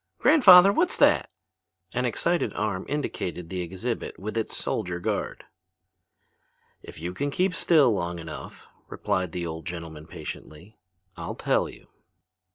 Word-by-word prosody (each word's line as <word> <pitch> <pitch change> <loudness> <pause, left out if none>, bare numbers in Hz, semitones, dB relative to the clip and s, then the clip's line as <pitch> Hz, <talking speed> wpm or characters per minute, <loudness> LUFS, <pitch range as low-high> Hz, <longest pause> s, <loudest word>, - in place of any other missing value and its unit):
"Grandfather, 195 - +8
what's 345 - +2
that?" - - +4 0.6
An - - 0
excited 175 0 0
arm 105 -3 -2
indicated 90 - -4
the 90 -1 -2
exhibit 95 +7 -4
with 105 +4 -6
its 115 -1 -2
soldier 90 -5 -2
guard. - - -3 1.4
"If - - -11
you 85 +2 -4
can 145 +10 -2
keep 180 +6 0
still 155 -7 +4
long 85 -3 -3
enough," 80 -1 -9 0.2
replied 90 -2 -2
the 85 0 -4
old 80 -1 -6
gentleman 80 -3 -7
patiently, 85 +6 -9 0.4
"I'll - - -6
tell - - 0
you." - - -14
95 Hz, 135 wpm, -26 LUFS, 85-145 Hz, 1.4 s, Grandfather